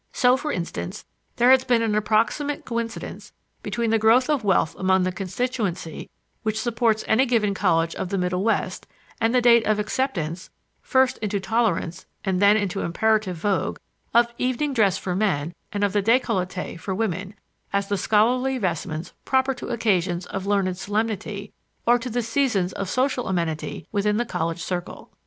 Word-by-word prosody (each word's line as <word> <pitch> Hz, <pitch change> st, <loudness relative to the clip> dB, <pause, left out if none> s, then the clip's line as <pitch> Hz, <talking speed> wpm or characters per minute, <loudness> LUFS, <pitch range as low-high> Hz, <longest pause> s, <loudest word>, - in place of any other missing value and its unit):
So, 250 Hz, -1 st, +4 dB
for 295 Hz, +3 st, -3 dB
instance, 180 Hz, +2 st, -4 dB, 0.3 s
there 245 Hz, +2 st, +5 dB
has 260 Hz, -1 st, +6 dB
been 245 Hz, -3 st, +2 dB
an 220 Hz, -2 st, 0 dB
approximate 220 Hz, +7 st, 0 dB
coincidence 230 Hz, -1 st, -5 dB, 0.3 s
between 225 Hz, +2 st, -1 dB
the 225 Hz, -, +3 dB
growth 235 Hz, +6 st, +4 dB
of 285 Hz, -6 st, 0 dB
wealth 190 Hz, -5 st, +2 dB
among 190 Hz, 0 st, +3 dB
the 185 Hz, -, 0 dB
constituency 190 Hz, -3 st, -3 dB, 0.3 s
which 220 Hz, 0 st, -1 dB
supports 230 Hz, -2 st, +1 dB
any 255 Hz, +5 st, +3 dB
given 220 Hz, -4 st, +2 dB
college 165 Hz, -4 st, +1 dB
of 185 Hz, -, -4 dB
the 195 Hz, -, -1 dB
Middle 180 Hz, 0 st, 0 dB
West 225 Hz, -, -1 dB, 0.3 s
and 225 Hz, 0 st, +3 dB
the 250 Hz, -, +3 dB
date 235 Hz, -1 st, +6 dB
of 215 Hz, -1 st, +3 dB
acceptance 205 Hz, -, -2 dB, 0.3 s
first 260 Hz, -1 st, +2 dB
into 205 Hz, -2 st, -1 dB
tolerance 190 Hz, -5 st, -1 dB, 0.2 s
and 190 Hz, -1 st, 0 dB
then 205 Hz, +1 st, +6 dB
into 200 Hz, -2 st, -1 dB
imperative 210 Hz, 0 st, +1 dB
vogue 195 Hz, +2 st, -1 dB, 0.3 s
of 235 Hz, 0 st, +3 dB
evening 255 Hz, +3 st, 0 dB
dress 210 Hz, -7 st, +3 dB
for 180 Hz, -2 st, -3 dB
men 175 Hz, -6 st, 0 dB, 0.2 s
and 205 Hz, -1 st, -2 dB
of 200 Hz, -1 st, +1 dB
the 205 Hz, -, +2 dB
décolleté 185 Hz, -6 st, 0 dB
for 190 Hz, +3 st, -3 dB
women, 195 Hz, -1 st, -2 dB, 0.4 s
as 200 Hz, 0 st, 0 dB
the 205 Hz, -, 0 dB
scholarly 245 Hz, +7 st, +2 dB
vestments 165 Hz, -4 st, -3 dB
proper 265 Hz, 0 st, +2 dB
to 245 Hz, -, -8 dB
occasions 190 Hz, -7 st, 0 dB
of 195 Hz, 0 st, -5 dB
learned 195 Hz, -3 st, +1 dB
solemnity 205 Hz, 0 st, -3 dB, 0.3 s
or 240 Hz, +1 st, +5 dB
to 250 Hz, +2 st, -5 dB
the 240 Hz, +1 st, -1 dB
seasons 225 Hz, -7 st, 0 dB
of 195 Hz, -2 st, -4 dB
social 255 Hz, +2 st, 0 dB
amenity 170 Hz, -4 st, -2 dB
within 210 Hz, 0 st, +1 dB
the 240 Hz, -, 0 dB
college 165 Hz, -4 st, -3 dB
circle. 175 Hz, -1 st, -5 dB
210 Hz, 170 wpm, -24 LUFS, 185-235 Hz, 0.4 s, has